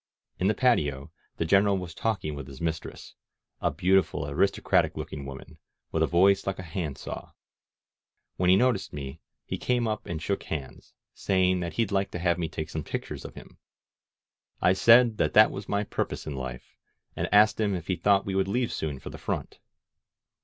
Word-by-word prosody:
In 95 - +2
the 105 - +2
patio 75 - +1 0.3
the 80 - -1
Gen 100 +5 +4
eral 100 -1 +2
was 90 -2 -7
talking 105 -9 -2
with 70 -2 -7
his 70 -2 -11
mistress, 80 -1 -5 0.5
a - - +2
beautiful, 90 -5 +1
aristo 85 +7 +1
cratic - - +2
looking 70 -2 -6
woman, 70 0 -10 0.3
with - - 0
a - - +4
voice 95 +3 +3
like 95 - -1
a 95 - -6
hand 85 -4 -4
saw. - - -8 1.0
When 90 -1 +1
he 95 - +7
noticed 120 -1 +1
me 70 +2 -7 0.2
he - - -4
came 120 -2 +1
up 110 -1 -3
and 80 - -3
shook 100 +4 -2
hands, 70 -5 -7 0.2
say 95 -1 +2
ing 90 - 0
that 85 -1 -4
he'd 115 -3 0
like 100 0 +1
to - - -2
have 85 0 +1
me 80 -2 -2
take 80 +1 -5
some 80 - -3
pictures - - -5
of - - -9
him. - - -13 1.0
I 90 - +4
said 115 +3 +5
that - - +1
that 110 +1 +7
was - - -7
my 100 0 +1
purpose - - -3
in 75 - -5
life, 65 -1 -7 0.4
and - - -3
asked 105 +1 +5
him 105 -3 +1
if 85 -3 -5
he 95 - 0
thought 100 +3 +2
he 95 - -2
would 95 0 +1
leave 120 +4 0
soon 75 -3 -3
for - - -8
the - - -9
front. - - -4
90 Hz, 205 wpm, -27 LUFS, 80-100 Hz, 1.0 s, he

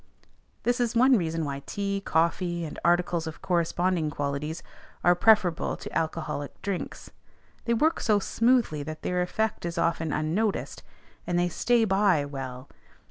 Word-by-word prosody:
This 245 +1 +1
is 240 -1 0
one 255 +3 +6
reason 165 -5 -1
why 140 -1 -4
tea, 200 -1 -2
coffee, 170 +1 0
and 155 - -7
articles 175 -1 +2
of 160 - -8
corresponding 175 -1 +1
qualities, 145 +3 -3 0.4
are 175 - +6
preferable 180 -2 +3
to - - -9
alcoholic 155 -3 -3
drinks: 195 -2 -4 0.5
they 235 - +2
work 315 +8 +2
so 215 -3 +3
smoothly 230 - +2
that 155 +2 -7
their 180 0 0
effect 220 +5 -1
is 170 0 -4
often 165 -2 0
unnoticed, 175 +9 -1 0.5
and 175 - 0
they 175 0 +2
"stay 235 +6 +2
by" 190 -6 +3
well. 130 -2 -7
175 Hz, 145 wpm, -27 LUFS, 155-205 Hz, 0.5 s, one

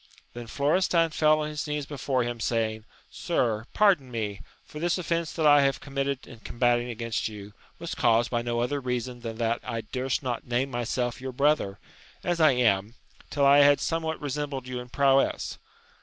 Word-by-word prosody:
Then 120 -1 -8
Florestan 165 +6 +2
fell 155 0 +3
on 150 - -2
his 150 0 -4
knees 150 -1 -2
before 135 -3 -1
him, 120 0 -4
saying, 110 -2 -1 0.3
Sir, 120 -7 -1
pardon 190 -11 +3
me! 105 -4 -4 0.2
for 150 - -9
this 175 +2 +1
offence 170 -2 -1
that 160 - -1
I 145 -1 +7
have 135 0 +1
committed 140 -1 -3
in 115 - -13
combatting 120 +1 0
against 115 -2 -2
you, 105 -1 -9 0.2
was 170 -1 -5
caused 115 -4 +2
by 120 -1 0
no 120 0 -1
other 140 +4 -1
reason 125 -1 -3
than 115 -2 -6
that 115 0 0
I 115 -1 -3
durst 130 +4 -3
not 125 -2 -3
name 125 +3 0
myself 120 0 -2
your 130 0 -5
brother, 140 -7 +1 0.5
as 175 -1 0
I 155 -3 +6
am, 110 -3 +1 0.3
till 140 -2 +1
I 140 +1 +7
had 145 0 +6
somewhat 160 -1 -2
resembled 140 -2 -4
you 125 -1 -4
in 125 0 -9
prowess. 135 +1 +1
130 Hz, 185 wpm, -27 LUFS, 120-145 Hz, 0.5 s, I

